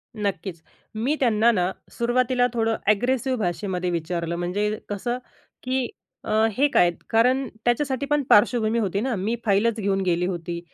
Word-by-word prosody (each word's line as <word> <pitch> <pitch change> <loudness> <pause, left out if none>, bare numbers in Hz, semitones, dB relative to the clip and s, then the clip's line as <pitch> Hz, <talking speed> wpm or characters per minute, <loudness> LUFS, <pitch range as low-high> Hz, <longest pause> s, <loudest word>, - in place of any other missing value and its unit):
नक्कीच. 195 -4 -3 0.3
मी 255 +8 0
त्यांना 230 -2 +4
ना 185 -4 0 0.2
सुरवातीला 245 +1 +1
थोडं 225 -1 +1
ॲग्रेसिव्ह 255 +4 +1
भाषेमध्ये 180 -1 -2
विचारलं, 170 0 -2
म्हणजे 180 +5 -1 0.2
कसं 240 +5 -2 0.5
की 255 -1 -1 0.4
अ, - - -3 0.3
हे 285 +2 +4
काय? 175 - +5 0.2
कारण 255 +4 +3 0.2
त्याच्यासाठी 265 +2 0
पण 295 0 +2
पार्श्वभूमी 220 +1 +4
होती 200 -2 -1
ना, 250 -1 -1
मी 205 +5 -1
फाईलच 215 +3 +2
घेऊन 195 -1 0
गेली 180 -1 +1
होती, 175 -1 -4
215 Hz, 145 wpm, -24 LUFS, 185-245 Hz, 0.5 s, काय